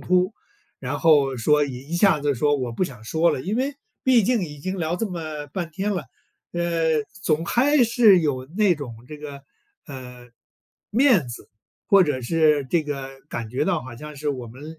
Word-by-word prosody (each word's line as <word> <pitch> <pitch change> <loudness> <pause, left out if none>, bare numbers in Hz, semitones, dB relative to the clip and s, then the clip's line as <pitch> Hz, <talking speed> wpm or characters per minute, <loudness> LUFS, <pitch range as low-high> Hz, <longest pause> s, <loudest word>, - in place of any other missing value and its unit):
突， 180 +2 +2 0.5
然 135 +2 -4
后 145 -5 +4
说 150 +6 +3
一 135 +3 -9
一 170 - -1
下 190 -4 +4
子 145 -1 +1
说： 145 +4 +2
“我 125 -3 -3
不 115 - -2
想 125 - -4
说 160 +7 +2
了”。 130 - -2
因 205 +6 -1
为 270 +2 -1 0.3
毕 250 -4 +5
竟 235 +1 +2
已 150 -3 -9
经 185 +5 -4
聊 165 +1 -1
这 225 - -1
么 155 -5 -6
半 170 +2 -4
天 195 +5 -2
了， 175 -7 -3 0.5
呃， 165 -3 +1 0.2
总 155 +1 +1
还 260 - +3
是 225 -5 +5
有 130 -5 -1
那 205 -5 +4
种 120 -6 -9
这 150 +1 -9
个， 140 -2 -9 0.4
呃， 125 -3 -10 0.6
面 225 - +4
子 120 - -9 0.4
或 200 -2 +7
者 140 -6 -1
是 150 +1 +2
这 170 - +2
个 135 -2 -6
感 115 -2 -5
觉 130 +5 -1
到 175 -5 0
好 130 -2 -9
像 150 +2 -9
是 145 +1 -2
我 125 -3 -5
们 150 +7 -11
155 Hz, 205 characters per minute, -23 LUFS, 135-180 Hz, 0.6 s, 或